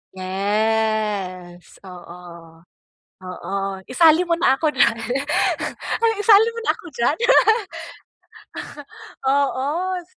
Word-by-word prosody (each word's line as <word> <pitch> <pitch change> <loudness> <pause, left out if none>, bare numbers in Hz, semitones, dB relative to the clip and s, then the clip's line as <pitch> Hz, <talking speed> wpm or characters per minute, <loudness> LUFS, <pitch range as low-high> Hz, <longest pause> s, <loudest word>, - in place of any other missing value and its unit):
Yes, 200 -2 -2
oo. 175 -2 -13 0.6
Oo, 195 +1 -5
isali 320 +5 +4
mo 335 - +2
na 335 -5 +2
ako 305 -3 0
diyan, 235 -2 +3 1.2
isali 425 +1 +5
mo 465 - -7
na - - +1
ako - - -17
diyan. 240 +6 0 2.1
Oo. 290 +7 -1
220 Hz, 80 wpm, -21 LUFS, 185-310 Hz, 2.1 s, isali